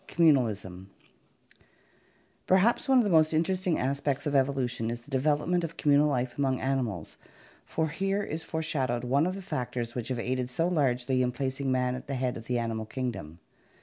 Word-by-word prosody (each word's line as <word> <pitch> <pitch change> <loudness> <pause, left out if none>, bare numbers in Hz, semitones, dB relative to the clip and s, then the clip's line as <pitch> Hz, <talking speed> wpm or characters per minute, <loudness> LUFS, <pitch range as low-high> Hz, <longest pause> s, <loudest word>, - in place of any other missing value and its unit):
Communalism 110 - +1 1.6
Perhaps 225 +10 +3
one 265 - +6
of 245 - +5
the 205 - 0
most 155 -1 +4
interesting 185 +2 +1
aspects 140 +1 -1
of 145 - -1
evolution 130 -4 +1
is 120 0 -4
the 145 - -18
development 150 +6 +1
of 165 0 -5
communal 145 0 +4
life 125 -2 -2
among 135 -2 +1
animals, 125 - -2 0.5
for 160 -1 -1
here 195 +5 -1
is 160 -3 -4
fore 160 0 -3
shadowed 130 -6 -1
one 140 +6 +2
of 185 - -2
the 195 - -7
factors 120 -7 -3
which 120 -3 -4
have 130 - -2
aided 125 +1 -2
so 165 +7 0
largely 130 -6 +1
in 125 -1 +1
placing 135 +1 -2
man 125 -1 +1
at 125 - -7
the 135 - -2
head 125 -1 -1
of 115 - -8
the 125 +1 -1
animal 115 -2 -2
kingdom. 115 - -5
135 Hz, 180 wpm, -28 LUFS, 125-160 Hz, 1.6 s, one